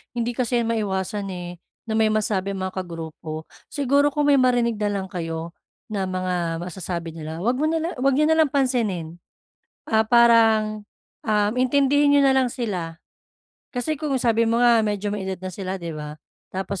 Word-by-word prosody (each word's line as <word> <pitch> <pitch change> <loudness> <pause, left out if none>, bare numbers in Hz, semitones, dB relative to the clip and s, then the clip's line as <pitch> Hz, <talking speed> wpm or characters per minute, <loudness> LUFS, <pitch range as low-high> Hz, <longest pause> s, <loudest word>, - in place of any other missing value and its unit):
Hindi 235 0 -2
kasi 245 -1 +1
'yan 230 - -2
maiwasan, 205 -2 -2
eh, 175 -1 -7 0.3
na 220 - 0
may 220 - +4
masabi 200 -2 0
ang 190 - -5
mga 185 - -14
kagrupo. 160 -2 -7 0.2
Siguro 285 +1 +1
kung 295 0 +2
may 280 - +6
marinig 245 -3 +2
na 210 0 0
lang 190 - -6
kayo 165 -2 -4 0.4
na 200 -3 -2
mga 180 -3 -2
masasabi 175 -1 -5
nila, 160 +1 -7
huwag 240 +6 +1
mo 300 - +1
nala 325 +1 -1
huwag 270 +2 +2
niyo 305 +3 +3
nalang 315 -3 +3
pansinin. 220 - 0 0.7
Ah, 220 0 +3
parang, 225 -2 +4 0.4
ah, 210 -1 +2
intindihin 280 +3 +3
niyo 285 - +5
na 270 -1 +4
lang 255 -2 +2
sila. 180 -9 -4 0.7
Kasi 275 +4 -2
kung 295 -4 0
sabi 230 -2 +2
mo 230 - +2
nga 240 -1 +5
medyo 205 -1 -1
may 195 -2 -4
edad 190 - -2
na 185 - -4
sila, 190 +1 -4
'di 170 -3 -6
ba? 150 -1 -7 0.3
Tapos 190 0 -4
215 Hz, 180 wpm, -23 LUFS, 185-250 Hz, 0.7 s, may